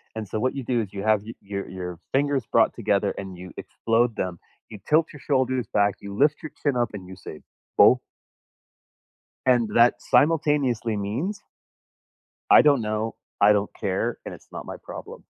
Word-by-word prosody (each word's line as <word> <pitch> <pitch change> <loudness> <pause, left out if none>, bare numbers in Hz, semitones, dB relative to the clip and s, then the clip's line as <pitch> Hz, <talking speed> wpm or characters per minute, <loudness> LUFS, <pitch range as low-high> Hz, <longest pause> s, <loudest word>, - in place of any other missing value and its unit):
and 110 -1 -5
so 110 - -3
what 130 +3 0
you 135 - -4
do 120 -1 0
is 100 -2 -7
you 100 0 -5
have 110 -2 +3
y 115 +2 -8
your 100 0 -5
your 90 -2 -6
fingers 140 -3 +1
brought - - +4
together - - 0
and 95 -2 -7
you 90 0 -10
explode 115 0 0
them, 90 -3 -3 0.3
you 105 - -10
tilt 160 +1 +4
your 150 - -11
shoulders 130 -4 0
back, 100 -1 +3
you 100 0 -8
lift 145 +1 +3
your 155 - -7
chin 140 -4 +1
up 120 -2 0
and 95 -3 -7
you 95 - -9
say, 80 -4 -10 0.4
"Boh." - - +7 1.5
And 120 -3 +4
that 120 +1 +6
simultaneously 145 -7 +2
means 130 - -3 1.1
I - - +9
don't 145 -5 +4
know. 110 +1 -2 0.3
I 105 +1 +7
don't 100 0 0
care. 95 -1 -1
And - - -6
it's - - -14
not - - -7
my - - -7
problem. - - -9
115 Hz, 185 wpm, -25 LUFS, 100-135 Hz, 1.5 s, I